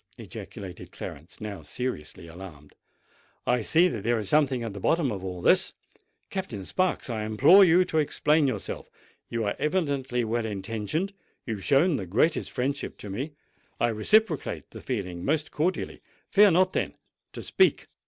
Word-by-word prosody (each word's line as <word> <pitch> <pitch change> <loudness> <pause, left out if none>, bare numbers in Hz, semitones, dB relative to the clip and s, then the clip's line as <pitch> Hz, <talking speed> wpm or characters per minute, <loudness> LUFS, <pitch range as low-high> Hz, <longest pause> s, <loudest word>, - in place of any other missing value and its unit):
ejaculated 95 -3 -9
Clarence, 75 +4 -9
now 105 -2 -6
seriously 95 -9 -5
alarmed. 80 -4 -11 0.7
"I 125 -1 +2
see 165 +10 +4
that 110 - -5
there 120 +1 +2
is 105 -3 -3
something 135 -2 +2
at 115 -3 -4
the 100 - -7
bottom 150 - +2
of 95 -3 -5
all 90 -2 -5
this! - - +4 0.6
Captain 125 - -4
Sparks, 185 - 0
I 110 -4 -3
implore 140 - +7
you 180 0 +5
to 160 -3 0
explain 150 0 +2
yourself. 130 - -4 0.4
You 115 -1 -1
are 100 - -1
evidently 140 -7 0
well 115 0 -1
intentioned—you 115 - -4
have 100 -3 -7
shown 145 +3 +3
the 95 - -5
greatest 130 - +1
friendship 135 +3 -3
for 105 - -7
me—I 135 0 -5
reciprocate 160 - +1
the - - -9
feeling 90 -8 -4
most 150 +2 0
cordially: 175 +5 -1 0.3
fear 205 0 +7
not, 185 +1 +3
then, - - -1 0.4
to - - -7
speak." 380 - +3
125 Hz, 155 wpm, -27 LUFS, 105-160 Hz, 0.7 s, implore